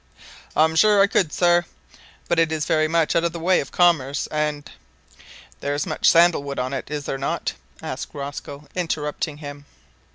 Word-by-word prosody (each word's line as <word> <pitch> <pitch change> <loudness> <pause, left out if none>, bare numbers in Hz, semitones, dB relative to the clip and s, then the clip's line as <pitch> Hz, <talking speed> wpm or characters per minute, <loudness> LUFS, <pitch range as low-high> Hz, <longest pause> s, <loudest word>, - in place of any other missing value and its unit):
"I'm 160 +1 +3
sure 210 +4 +5
I 195 - +7
could, 185 -5 +1
sir; 175 +1 +3 0.6
but 170 - +1
it 165 -1 +2
is 155 -1 -1
very 155 0 +2
much 165 0 +1
out 170 - +3
of 170 -1 -1
the 170 - -5
way 180 +3 +3
of - - -5
commerce, 155 -6 +2
and 150 -1 -2 0.5
" - - -20
"There 145 0 -2
is 145 - -1
much - - +2
sandal 170 -2 +5
wood 140 -1 -6
on 130 +1 -2
it, 135 - -5
is 145 -1 -4
there 135 - -3
not?" 140 - -2 0.3
asked - - -5
Rosco, 140 +1 -7
interrupting 155 -3 -3
him. 145 -1 -9
155 Hz, 190 wpm, -22 LUFS, 145-170 Hz, 0.6 s, I